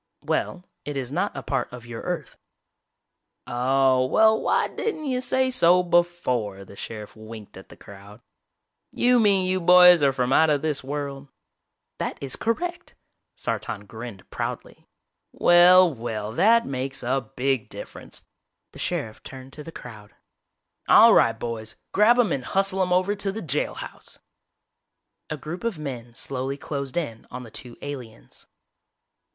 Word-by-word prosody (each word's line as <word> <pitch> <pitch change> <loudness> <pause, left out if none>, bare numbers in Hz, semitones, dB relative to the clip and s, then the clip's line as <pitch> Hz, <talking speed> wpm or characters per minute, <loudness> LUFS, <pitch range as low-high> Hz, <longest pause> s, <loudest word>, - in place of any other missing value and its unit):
"Well, 180 0 -2 0.2
it 145 -1 -5
is 130 -1 -4
not - - -2
a - - -5
part - - -2
of 125 -1 -10
your 115 -1 -7
Earth." - - -4 1.1
"Oh, 130 +1 +2
well 220 +8 +4
why - - +1
didn't 365 -9 -4
you 255 -2 -1
say 260 +1 +1
so 180 -7 +4
before!" 165 - 0
The 100 - -14
sheriff 105 0 -8
winked 110 -1 -11
at 95 - -13
the - - -14
crowd. 100 +2 -14 0.7
"You 245 0 +3
mean 200 -4 +3
you 185 0 0
boys 180 -1 +8
are 140 -1 +4
from 130 -1 0
out 160 +2 +5
of 145 -1 +1
this 150 -4 -1
world?" 140 0 -5 0.7
"That - - -3
is 135 -2 -4
correct," 345 +10 -3 0.4
Sartan 105 -1 -4
grinned 110 -2 -9
proudly. - - -6 0.4
"Well, 175 0 +6
well! 110 -3 -5
That 230 - +4
makes 135 0 -4
a 130 +3 0
big 130 -2 -1
difference!" - - -10 0.5
The - - -13
sheriff 110 -1 -3
turned 130 0 -11
to 150 - -9
the 165 - -9
crowd. 110 -8 -12 0.7
"All - - +8
right, 115 -1 +4
boys, 115 -2 -5 0.2
grab 215 +4 +5
them 240 -7 +2
and 135 - -2
hustle 195 +5 +1
them 185 -1 +1
over 185 +3 +2
to 195 0 -1
the 220 +2 -6
jail 150 -2 -1
house!" - - -9 1.1
A 155 - -4
group 160 +7 -7
of 230 -7 -2
men 125 -6 -7
slowly 135 +2 -4
closed 140 0 -5
in 130 -10 -4
on 125 0 -7
the 115 - -12
two 120 +1 -8
aliens. 125 -6 -9
140 Hz, 155 wpm, -24 LUFS, 120-180 Hz, 1.1 s, boys